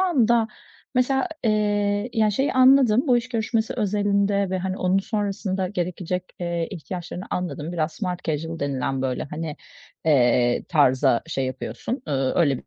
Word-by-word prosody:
anda 235 Hz, -, +3 dB, 0.5 s
mesela, 265 Hz, +6 st, +2 dB, 0.2 s
eee, 205 Hz, 0 st, +1 dB
ya, 220 Hz, -2 st, +3 dB
şeyi 265 Hz, +7 st, 0 dB
anladım, 255 Hz, -3 st, +5 dB
bu 250 Hz, -3 st, +5 dB
iş 240 Hz, +1 st, -2 dB
görüşmesi 225 Hz, -1 st, -1 dB
özelinde 200 Hz, -2 st, +1 dB
ve, 185 Hz, -, 0 dB
hani, 185 Hz, +1 st, -3 dB
onun 185 Hz, 0 st, +2 dB
sonrasında 195 Hz, -2 st, -2 dB
gerekecek, 180 Hz, -1 st, -3 dB, 0.2 s
eee, 170 Hz, -1 st, -2 dB
ihtiyaçlarını 175 Hz, +1 st, -6 dB
anladım. 175 Hz, -2 st, -3 dB
Biraz 160 Hz, -2 st, -1 dB
smart 180 Hz, -2 st, -4 dB
casual 160 Hz, +1 st, -3 dB
denilen, 135 Hz, -2 st, -2 dB
böyle 130 Hz, -1 st, -1 dB
hani, 150 Hz, +1 st, -5 dB, 0.5 s
eee, 120 Hz, -5 st, +3 dB
tarza 130 Hz, -5 st, +3 dB
şey 135 Hz, -5 st, -2 dB
yapıyorsun, 180 Hz, -, -5 dB
ııı, 135 Hz, -2 st, 0 dB
öyle 140 Hz, -6 st, +1 dB
185 Hz, 140 wpm, -24 LUFS, 155-215 Hz, 0.5 s, anladım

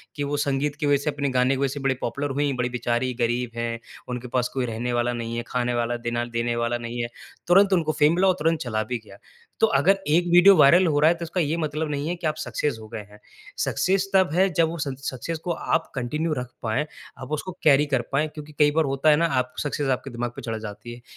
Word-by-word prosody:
कि 145 Hz, -, -2 dB
वो 145 Hz, +1 st, -2 dB
संगीत 145 Hz, 0 st, 0 dB
की -, -, -1 dB
वजह 145 Hz, -1 st, +4 dB
से 150 Hz, -, 0 dB
अपने 145 Hz, -1 st, -2 dB
गाने 130 Hz, +1 st, +2 dB
की -, -, -4 dB
वजह 140 Hz, -, +3 dB
से 145 Hz, -, -5 dB
बड़े 135 Hz, -1 st, 0 dB
पॉपुलर 140 Hz, +4 st, -2 dB
हुईं। 140 Hz, -1 st, 0 dB
बड़ी 125 Hz, 0 st, 0 dB
बेचारी 120 Hz, +1 st, -1 dB
गरीब 120 Hz, +1 st, 0 dB
हैं। 115 Hz, 0 st, -3 dB, 0.3 s
उनके 125 Hz, 0 st, -4 dB
पास 125 Hz, 0 st, 0 dB
कोई 130 Hz, -2 st, -1 dB
रहने 120 Hz, +1 st, -3 dB
वाला 120 Hz, 0 st, +1 dB
नहीं 115 Hz, -1 st, -4 dB
है, 120 Hz, -, -2 dB
खाने 125 Hz, -1 st, -1 dB
वाला 120 Hz, 0 st, -1 dB
दिना 120 Hz, 0 st, -1 dB
देने 120 Hz, 0 st, -2 dB
वाला 120 Hz, 0 st, 0 dB
नहीं 120 Hz, 0 st, -5 dB
है। 120 Hz, -, -2 dB, 0.4 s
तुरंत 195 Hz, +3 st, +5 dB
उनको 165 Hz, -4 st, +2 dB
फ़ेम 150 Hz, +2 st, +5 dB
मिला 190 Hz, +2 st, +3 dB
और 185 Hz, -, +4 dB
तुरंत 165 Hz, +1 st, +1 dB
चला 110 Hz, -3 st, -1 dB
भी 120 Hz, +3 st, -3 dB
गया। 100 Hz, -, -14 dB, 0.4 s
तो 225 Hz, -, +5 dB
अगर 195 Hz, +8 st, +3 dB
एक 170 Hz, +4 st, +3 dB
वीडियो 185 Hz, +3 st, +8 dB
वायरल 170 Hz, +6 st, +6 dB
हो 145 Hz, -2 st, +2 dB
रहा 155 Hz, -, +5 dB
है 170 Hz, -, +3 dB
तो 170 Hz, -, -7 dB
इसका 170 Hz, +2 st, -3 dB
ये 160 Hz, +1 st, 0 dB
मतलब 155 Hz, -1 st, -2 dB
नहीं 145 Hz, 0 st, -2 dB
है 175 Hz, -, -1 dB
कि 170 Hz, -2 st, -3 dB
आप 155 Hz, -, -1 dB
सक्सेस 150 Hz, -3 st, -2 dB
हो 110 Hz, -, -10 dB
गए 115 Hz, -1 st, -6 dB
हैं। 105 Hz, 0 st, -16 dB, 0.5 s
सक्सेस 195 Hz, +1 st, 0 dB
तब 190 Hz, -1 st, +5 dB
है 185 Hz, +3 st, +4 dB
जब 165 Hz, +1 st, +3 dB
वो 165 Hz, -, -5 dB
उस 150 Hz, -4 st, -3 dB
इन्स 135 Hz, 0 st, -4 dB
सक्सेस 155 Hz, +6 st, -5 dB
को 180 Hz, -, -2 dB
आप 165 Hz, 0 st, -1 dB
कंटिन्यू 150 Hz, +6 st, -1 dB
रख 125 Hz, -, -3 dB, 0.2 s
पाएँ। 110 Hz, +6 st, 0 dB, 0.4 s
आप 130 Hz, +3 st, -8 dB
उसको 155 Hz, +5 st, -3 dB
कैरी 145 Hz, -1 st, +5 dB
कर 135 Hz, -4 st, 0 dB
पाएँ। 150 Hz, +3 st, +1 dB
क्योंकि 150 Hz, 0 st, -10 dB
कई 145 Hz, -1 st, +5 dB
बार 160 Hz, -1 st, +3 dB
होता 135 Hz, +3 st, +2 dB
है 150 Hz, -, +7 dB
ना 165 Hz, +3 st, +2 dB
आप 125 Hz, 0 st, -3 dB
सक्सेस 145 Hz, -1 st, -2 dB
आपके 135 Hz, -, -10 dB
दिमाग 120 Hz, 0 st, -3 dB
पे -, -, -7 dB
चढ़ 115 Hz, -2 st, -4 dB
जाती 110 Hz, +2 st, -8 dB
है। 120 Hz, -, -12 dB
140 Hz, 265 wpm, -24 LUFS, 120-155 Hz, 0.5 s, वीडियो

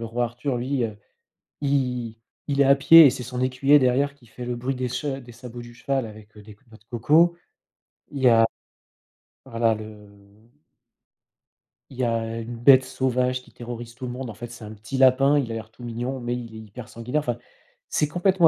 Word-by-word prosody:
le -, -, -4 dB
roi 120 Hz, +2 st, -1 dB
Arthur 125 Hz, +3 st, -3 dB
lui, 130 Hz, 0 st, -1 dB
heu, 105 Hz, -2 st, -5 dB, 0.7 s
il 125 Hz, -5 st, -1 dB, 0.3 s
il 140 Hz, -1 st, 0 dB
est -, -, +6 dB
à 135 Hz, +1 st, +6 dB
pied 160 Hz, +3 st, +9 dB
et -, -, +6 dB
c'est 125 Hz, 0 st, -6 dB
son 125 Hz, +1 st, -5 dB
écuyer, 135 Hz, +3 st, +4 dB
derrière, 135 Hz, +2 st, +1 dB
qui 135 Hz, -4 st, -23 dB
fait 120 Hz, +2 st, -9 dB
le 125 Hz, -, -2 dB
bruit 125 Hz, +3 st, -2 dB
des 125 Hz, -1 st, -3 dB
chats 135 Hz, +2 st, -3 dB
des 120 Hz, -2 st, -13 dB
sabots 120 Hz, 0 st, -10 dB
du 120 Hz, 0 st, -12 dB
cheval, 135 Hz, +2 st, -2 dB
avec 110 Hz, 0 st, -13 dB
des, 105 Hz, -, -13 dB
heu, -, -, -14 dB
des 105 Hz, -1 st, -13 dB
noix 110 Hz, -, -15 dB
de 110 Hz, -, -30 dB
coco. 155 Hz, +9 st, +3 dB, 0.7 s
Il 140 Hz, -, -6 dB
y 125 Hz, -, +7 dB
a 115 Hz, -1 st, +6 dB, 1.0 s
voilà 115 Hz, -3 st, +1 dB
le 105 Hz, -1 st, -10 dB, 1.8 s
il 130 Hz, -, -12 dB
y 130 Hz, -, -1 dB
a, 115 Hz, -1 st, 0 dB
heu, 115 Hz, 0 st, -5 dB
une 120 Hz, +1 st, -7 dB
bête 130 Hz, +2 st, +6 dB
sauvage 125 Hz, -1 st, 0 dB
qui -, -, -20 dB
terrorise 120 Hz, 0 st, -8 dB
tout 125 Hz, -, -7 dB
le 125 Hz, -, -4 dB
monde, 125 Hz, -1 st, -6 dB
en -, -, -7 dB
fait, 120 Hz, +2 st, -8 dB
c'est 120 Hz, -1 st, -11 dB
un 105 Hz, 0 st, -8 dB
petit 110 Hz, +5 st, -6 dB
lapin, 135 Hz, +2 st, +5 dB
il 125 Hz, -5 st, -1 dB
a -, -, -3 dB
l'air 110 Hz, -1 st, -7 dB
tout 120 Hz, -, -15 dB
mignon, 120 Hz, +3 st, -4 dB
mais 120 Hz, 0 st, -2 dB
il 115 Hz, -2 st, -8 dB
est 110 Hz, -, -8 dB
hyper 110 Hz, +2 st, -10 dB
sanguinaire 120 Hz, +5 st, -2 dB
enfin, 120 Hz, -5 st, -2 dB, 0.5 s
c'est 150 Hz, -, +1 dB
complètement 175 Hz, +2 st, +3 dB
125 Hz, 220 wpm, -24 LUFS, 115-135 Hz, 1.8 s, pied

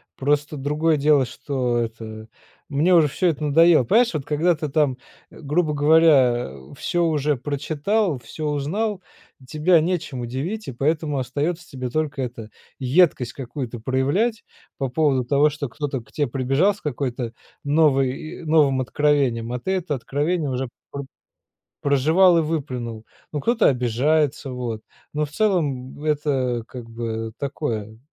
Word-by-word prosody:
просто 145 Hz, +2 st, 0 dB
другое 150 Hz, +3 st, +1 dB
дело, 145 Hz, -2 st, +3 dB
что 125 Hz, -2 st, -2 dB
это 110 Hz, -1 st, -6 dB, 0.4 s
мне 155 Hz, +6 st, +2 dB
уже 160 Hz, -3 st, +6 dB
всё 180 Hz, +6 st, 0 dB
это 155 Hz, -2 st, -1 dB
надоело. 160 Hz, -1 st, +5 dB
Понимаешь, 230 Hz, -, +3 dB
вот 150 Hz, -4 st, -3 dB
когда 160 Hz, +4 st, +2 dB
ты 150 Hz, -1 st, -4 dB
там, 140 Hz, -3 st, +1 dB, 0.3 s
грубо 150 Hz, +1 st, -1 dB
говоря, 145 Hz, -, +4 dB
э, 65 Hz, -, -13 dB
всё 175 Hz, +3 st, 0 dB
уже 150 Hz, -2 st, +1 dB
прочитал, 150 Hz, -, -1 dB
всё 150 Hz, +6 st, -7 dB
узнал, 185 Hz, +9 st, -1 dB, 0.5 s
тебя 160 Hz, +5 st, +3 dB
нечем 165 Hz, -7 st, -2 dB
удивить, 145 Hz, -, -4 dB
и 130 Hz, -, -5 dB
поэтому 150 Hz, +1 st, 0 dB
остается 150 Hz, +7 st, -2 dB
тебе 130 Hz, -2 st, -5 dB
только 150 Hz, 0 st, -2 dB
это, 115 Hz, -3 st, -6 dB, 0.3 s
едкость 130 Hz, -2 st, +2 dB
какую-то 125 Hz, -2 st, -6 dB
проявлять 140 Hz, -, 0 dB, 0.3 s
по 135 Hz, -, -1 dB
поводу 135 Hz, -1 st, +2 dB
того, 145 Hz, +4 st, +4 dB
что 145 Hz, -3 st, -5 dB
кто-то 140 Hz, -1 st, -4 dB
к 115 Hz, -, -22 dB
те 145 Hz, -, 0 dB
прибежал 135 Hz, -, +2 dB
с 205 Hz, -, -16 dB
какой-то 125 Hz, -4 st, -3 dB, 0.3 s
новой 145 Hz, -3 st, +3 dB, 0.3 s
и -, -, -11 dB
новым 150 Hz, -4 st, +3 dB
откровением, 130 Hz, -3 st, +1 dB
а 125 Hz, -, -2 dB
ты 190 Hz, -, -3 dB
это 180 Hz, -6 st, -1 dB
откровение 145 Hz, +4 st, -1 dB
уже 130 Hz, +1 st, -2 dB, 0.2 s
пр 140 Hz, -, -4 dB, 0.8 s
прожевал 160 Hz, +6 st, +4 dB
и -, -, +3 dB
выплюнул. 125 Hz, -8 st, -4 dB, 0.3 s
Ну 150 Hz, -, -2 dB
кто-то 235 Hz, -, +3 dB
обижается 135 Hz, +4 st, +1 dB
вот, 120 Hz, -3 st, -4 dB, 0.3 s
но 150 Hz, 0 st, 0 dB
в -, -, -11 dB
целом 150 Hz, -9 st, -1 dB
это 140 Hz, -6 st, 0 dB
как 120 Hz, -3 st, -9 dB
бы 115 Hz, -1 st, -4 dB
такое. 115 Hz, -7 st, -4 dB
145 Hz, 145 wpm, -23 LUFS, 125-155 Hz, 0.8 s, уже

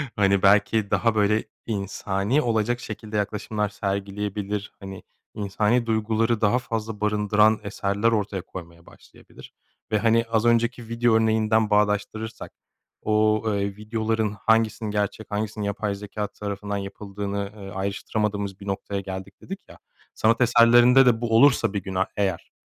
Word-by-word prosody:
Hani, 100 Hz, -2 st, +3 dB
belki 100 Hz, +1 st, +3 dB
daha 115 Hz, -2 st, +2 dB
böyle 105 Hz, +1 st, +2 dB, 0.2 s
insani 100 Hz, +3 st, -1 dB
olacak 120 Hz, 0 st, 0 dB
şekilde 110 Hz, -1 st, -6 dB
yaklaşımlar 105 Hz, 0 st, -2 dB
sergileyebilir. 100 Hz, +1 st, -3 dB
Hani, 95 Hz, -1 st, -9 dB, 0.3 s
insani 105 Hz, +4 st, 0 dB
duyguları 110 Hz, 0 st, 0 dB
daha 110 Hz, +4 st, +3 dB
fazla 110 Hz, -3 st, -5 dB
barındıran 105 Hz, +1 st, +3 dB
eserler 100 Hz, +2 st, 0 dB
ortaya 105 Hz, -3 st, -1 dB
koymaya 85 Hz, -1 st, -11 dB
başlayabilir -, -, -16 dB, 0.4 s
ve, 110 Hz, -, +2 dB
hani, 115 Hz, +1 st, +3 dB
az 115 Hz, 0 st, +1 dB
önceki 115 Hz, 0 st, +1 dB
video 115 Hz, 0 st, +1 dB
örneğinden 110 Hz, -1 st, +2 dB
bağdaştırırsak 105 Hz, +1 st, -1 dB, 0.5 s
o, 110 Hz, 0 st, +2 dB
eee, 100 Hz, 0 st, -2 dB
videoların 110 Hz, 0 st, -1 dB
hangisinin 110 Hz, 0 st, +1 dB
gerçek 105 Hz, +1 st, -3 dB
hangisinin 105 Hz, 0 st, -3 dB
yapay 100 Hz, 0 st, -2 dB
zekâ 105 Hz, +1 st, -5 dB
tarafından 100 Hz, 0 st, -5 dB
yapıldığını, 100 Hz, 0 st, -5 dB
ııı, 95 Hz, -1 st, -9 dB
ayrıştıramadığımız 100 Hz, 0 st, -2 dB
bir 100 Hz, -, -10 dB
noktaya 100 Hz, 0 st, -3 dB
geldik 95 Hz, 0 st, -8 dB
dedik 195 Hz, +1 st, -7 dB
ya. -, -, -13 dB, 0.4 s
Sanat 115 Hz, +2 st, +2 dB
eserlerinde 120 Hz, +2 st, +6 dB
de 120 Hz, -2 st, +3 dB
bu 115 Hz, -1 st, 0 dB
olursa 120 Hz, -5 st, +4 dB
bir 100 Hz, -2 st, -3 dB
gün, 95 Hz, -1 st, -6 dB
ah, 95 Hz, -, +2 dB
eğer 95 Hz, -4 st, -2 dB
105 Hz, 140 wpm, -24 LUFS, 100-110 Hz, 0.5 s, eserlerinde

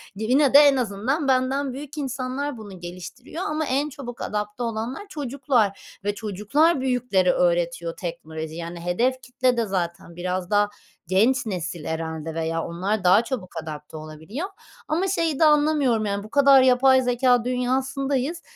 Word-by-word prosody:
yine 255 Hz, +7 st, +2 dB
de 285 Hz, -, +10 dB
en 285 Hz, -2 st, +6 dB
azından 250 Hz, +5 st, -1 dB
benden 265 Hz, +1 st, +1 dB
büyük 285 Hz, +2 st, -8 dB
insanlar 270 Hz, 0 st, -3 dB
bunu 205 Hz, -4 st, -10 dB
geliştiriyor. 180 Hz, -, -8 dB
Ama 310 Hz, +1 st, -1 dB
en 280 Hz, +2 st, 0 dB
çabuk 260 Hz, -4 st, -8 dB
adapte 210 Hz, +3 st, -3 dB
olanlar 230 Hz, -, -4 dB
çocuklar 260 Hz, -, -1 dB
ve 205 Hz, 0 st, -1 dB
çocuklar 225 Hz, -, +1 dB
büyüklere 245 Hz, -8 st, +2 dB
öğretiyor 170 Hz, -1 st, 0 dB
teknolojiyi. 160 Hz, -2 st, -6 dB
Yani 170 Hz, +1 st, -6 dB
hedef 240 Hz, +10 st, 0 dB
kitle 250 Hz, -1 st, 0 dB
de 230 Hz, -, +1 dB
zaten 170 Hz, -3 st, -4 dB
biraz 180 Hz, +1 st, -3 dB
daha 205 Hz, 0 st, +3 dB, 0.4 s
genç 225 Hz, +9 st, +3 dB
nesil 175 Hz, -5 st, -4 dB
herhâlde 160 Hz, 0 st, -4 dB
veya 165 Hz, 0 st, -2 dB
onlar 185 Hz, +4 st, -2 dB
daha 185 Hz, +5 st, +5 dB
çabuk 230 Hz, -8 st, -5 dB
adapte 150 Hz, 0 st, -8 dB
olabiliyor. 160 Hz, -, -6 dB, 0.4 s
Ama 340 Hz, +5 st, 0 dB
şeyi 330 Hz, -6 st, 0 dB
de 320 Hz, -, +6 dB
anlamıyorum. 295 Hz, -7 st, +3 dB
Yani 200 Hz, 0 st, -2 dB
bu 215 Hz, -, -11 dB
kadar 275 Hz, 0 st, +6 dB
yapay 260 Hz, +1 st, +5 dB
zekâ 245 Hz, -1 st, +2 dB
dünyasındayız. 265 Hz, +4 st, -1 dB
240 Hz, 150 wpm, -24 LUFS, 180-270 Hz, 0.4 s, de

